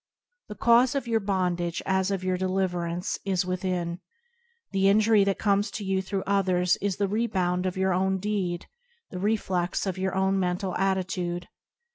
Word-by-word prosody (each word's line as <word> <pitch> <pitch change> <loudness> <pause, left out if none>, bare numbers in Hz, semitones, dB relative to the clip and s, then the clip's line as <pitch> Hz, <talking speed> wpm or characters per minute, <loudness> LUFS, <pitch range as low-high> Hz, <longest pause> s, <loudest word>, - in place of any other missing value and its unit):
The 210 - -6
cause 240 +4 +4
of 275 -3 -2
your 225 -1 +2
bondage 180 -4 -1
as 190 0 +1
of 195 -2 -2
your 185 0 0
deliverance 180 -1 -1
is 190 -2 0
with 185 +1 -3
in. 175 -2 -2 0.7
The 195 0 +3
injury 215 0 +5
that 195 -1 0
comes 205 0 +1
to 215 - -6
you 190 0 +1
through 190 0 -3
others 185 -2 +2
is 200 -1 -1
the 200 - 0
rebound 185 -4 0
of 185 - -3
your 190 0 +2
own 190 +1 +1
deed, 190 -3 -2 0.5
the 180 - -5
reflex 190 -4 0
of 190 -1 -3
your 190 0 -1
own 190 0 +2
mental 180 0 -1
attitude. 180 -2 -1
190 Hz, 170 wpm, -27 LUFS, 180-200 Hz, 0.7 s, injury